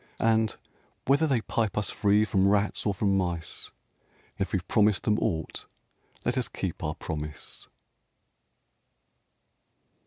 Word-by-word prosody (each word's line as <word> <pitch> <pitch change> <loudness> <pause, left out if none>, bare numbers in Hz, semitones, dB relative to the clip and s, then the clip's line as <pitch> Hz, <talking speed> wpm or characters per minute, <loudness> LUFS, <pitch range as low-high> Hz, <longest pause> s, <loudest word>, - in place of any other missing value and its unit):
And, 110 -1 +2 0.5
whether 145 +4 +4
they 130 -6 +2
pipe 110 -2 -1
us 105 -2 0
free 105 +1 +3
from 95 -2 +2
rats 105 +1 +1
or 100 - +2
from 100 0 +1
mice, 85 -4 -2 0.7
If 95 - -1
we've 90 -3 -2
promised 105 -3 +3
them 105 0 +2
aught, 80 -2 -2 0.6
let 125 +2 +1
us 120 - 0
keep 90 -4 -5
our 75 -1 -2
promise 75 -1 -6
105 Hz, 125 wpm, -28 LUFS, 90-110 Hz, 0.7 s, whether